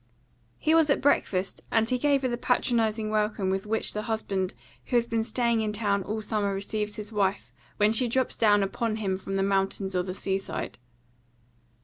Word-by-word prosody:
He 315 - +2
was 325 -2 +5
at 280 - +3
breakfast, 195 -9 +1
and 225 0 +2
he 250 +1 0
gave 280 0 +2
her - - +2
the 240 - -1
patronising 225 -3 +1
welcome 210 -3 0
with 195 +2 -2
which 220 +1 0
the 210 - -2
husband 195 -4 -1 0.3
who 250 - -2
has 235 -1 +3
been 225 -1 0
staying 235 -1 +1
in 215 -1 -1
town 205 -2 0
all 215 +3 -4
summer 205 -2 0
receives 210 +1 -3
his 210 0 -6
wife 200 -2 -1 0.2
when 210 +1 +4
she 235 +3 +2
drops 260 +2 0
down 205 -2 +4
upon 215 +3 -1
him 195 -3 -2
from 195 - -6
the 195 - +1
mountains 195 0 0
or 180 - +2
the 185 0 -5
sea 195 0 -1
side. 195 - -6
215 Hz, 200 wpm, -27 LUFS, 195-230 Hz, 0.3 s, was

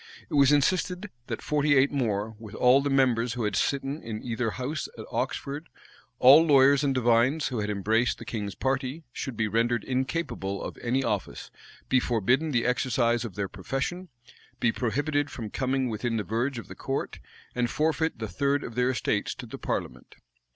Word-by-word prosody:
It - - -6
was 140 -1 +5
insisted 180 +6 +1 0.2
that - - -5
forty 150 -1 +2
eight 135 +1 +4
more, 110 -5 -1
with 110 -1 -10
all 125 +2 +5
the 145 - -1
members 125 -4 +2
who 120 -1 -3
had 105 -2 -1
sitten 140 +2 -1
in 110 -1 -6
either 115 -1 -1
house 130 +5 -4
at - - -7
Oxford, 145 +4 -3 0.5
all 135 +6 +8
lawyers 140 -2 +5
and 140 - +2
divines 125 +5 +3
who 125 -4 -3
had 105 0 -2
embraced 110 +4 +1
the - - -10
king's 105 -4 -4
party, 135 +3 -2
should 130 -5 -5
be 110 - +1
rendered 115 +1 +1
incapable 130 - -2
of - - -6
any 125 +3 0
office, 105 -5 -3 0.4
be 130 - +4
forbidden 125 +6 +1
the 120 -5 +1
exercise 120 -1 +1
of 110 -7 -7
their 100 -1 -2
profession, 135 - -4 0.5
be 120 - +3
prohibited 145 +6 -1
from 110 -7 -7
coming 130 0 0
within 115 +1 -2
the 105 - -1
verge 120 +6 -1
of 115 - -7
the - - -8
court, - - -4 0.3
and 120 -1 0
forfeit 160 +1 0
the 110 -1 -4
third 140 +9 0
of 115 - -7
their 125 +1 +1
estates 115 -5 -1
to - - -8
the - - -9
parliament. 60 -1 -4
125 Hz, 185 wpm, -27 LUFS, 115-140 Hz, 0.5 s, all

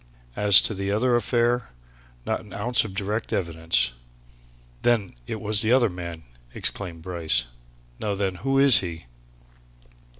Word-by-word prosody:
As 100 -1 +7
to - - -1
the 100 0 -4
other 120 +4 +1
affair 120 +1 0 0.6
not - - -1
an 105 - -14
ounce 120 +4 +1
of 100 -4 -8
direct 105 +3 -3
evidence!" 80 -8 0 0.9
"Then 115 -6 +1
it 110 - -5
was 105 -1 +2
the 110 - +1
other 125 -5 +3
man!" 85 -2 -8 0.3
exclaimed 85 -5 -2
Bryce. 80 -9 0 0.5
"Now 105 -2 -2
then, 95 -1 -1
who 135 +6 -1
is 135 -2 +7
he?" 85 -5 -7
100 Hz, 140 wpm, -24 LUFS, 85-115 Hz, 0.9 s, As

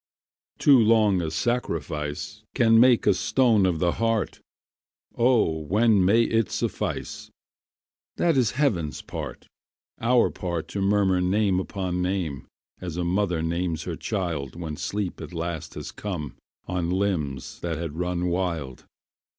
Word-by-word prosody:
Too 140 -3 +6
long 110 -4 +4
a 80 - -2
sacrifice 80 -7 -3
Can 115 -1 +5
make 125 -1 +5
a 105 - +5
stone 110 -1 +3
of 90 -3 0
the 85 +2 +2
heart. 115 -1 -1 0.7
O 115 -10 +3
when 105 +5 +3
may 110 +6 +5
it 115 -2 +1
suffice? - - -3 0.9
That 170 -3 +2
is 125 -5 +2
heaven's 90 - 0
part, - - -7 0.5
our 120 +1 +3
part 85 -3 -4
To 100 - -3
murmur 95 -2 +2
name 95 +1 +2
upon 90 -1 -3
name, 90 -7 -2 0.3
As 85 -2 -6
a 90 - -1
mother 90 -2 0
names 85 -1 -1
her - - -4
child 80 -9 -3
When 80 -3 -5
sleep 100 +3 -3
at - - -8
last 85 -1 -4
has - - -6
come 85 -9 -5 0.3
On 90 -2 -2
limbs 90 -9 -2
that 85 -3 -3
had 80 -2 -5
run 90 0 -1
wild. 85 -7 -2
90 Hz, 140 wpm, -25 LUFS, 85-105 Hz, 0.9 s, Too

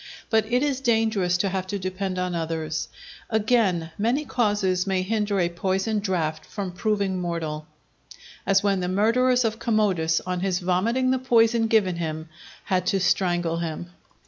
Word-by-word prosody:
But 220 0 +2
it 250 +3 +3
is 280 -3 0
dangerous 220 -7 +2
to 195 +2 0
have 190 0 -3
to 200 +1 -2
depend 185 0 -3
on 180 0 -1
others. 160 -2 -3 0.4
Again, 210 -7 +1
many 245 +8 +1
causes 205 -7 0
may 190 -1 +1
hinder 205 0 0
a 175 - +2
poisoned 190 +5 -1
draught 160 -5 -1
from 195 +2 -5
proving 195 -1 -1
mortal; 160 -3 -4 0.8
as 195 0 +3
when 200 -2 +2
the 180 - -2
murderers 240 +6 +2
of 225 0 -1
Commodus, 190 -8 +1
on 180 -1 -3
his 185 -1 0
vomiting 210 +8 +1
the 260 - +1
poison 230 -2 +3
given 200 -6 +2
him, 160 -1 -4 0.3
had 185 -1 0
to 195 - +2
strangle 175 -2 +1
him. 170 +1 -5
190 Hz, 160 wpm, -24 LUFS, 175-220 Hz, 0.8 s, it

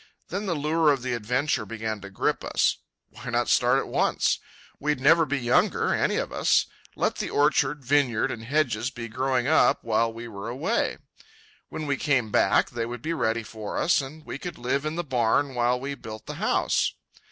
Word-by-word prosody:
Then 200 +1 -3
the 175 - 0
lure 155 +2 +2
of 135 -3 -1
the 130 -1 -1
adventure 125 +3 0
began 110 0 -4
to 100 - -9
grip 95 - -1
us. - - +1 0.3
Why 125 +1 -8
not 120 0 0
start 125 +1 +4
at - - -1
once? - - +1 0.4
We'd 150 -2 0
never 160 +4 +5
be 145 - 0
younger, 120 -2 +2
any - - +1
of - - -2
us. - - +3 0.3
Let - - 0
the - - -3
orchard, 145 -1 +1
vineyard, 130 -4 +2
and 110 - -6
hedges 125 -3 0
be 120 -3 -7
growing 130 +1 0
up 145 -4 +3
while 115 0 +1
we 115 +1 -8
were 105 0 -7
away. 125 +3 -1 0.7
When 155 - -5
we 140 -2 0
came 125 -7 +1
back, 100 - +3
they 115 -1 -3
would 120 -1 -7
be 165 - -1
ready 115 -6 0
for 110 -1 -6
us, 175 -3 +3
and 150 +3 -10
we 140 - -6
could 175 - -6
live 135 +4 -1
in 155 - -3
the 175 - -2
barn 130 0 +1
while 125 0 +1
we 140 +2 -4
built 110 -5 -9
the - - -6
house. - - +1
125 Hz, 195 wpm, -26 LUFS, 115-145 Hz, 0.7 s, never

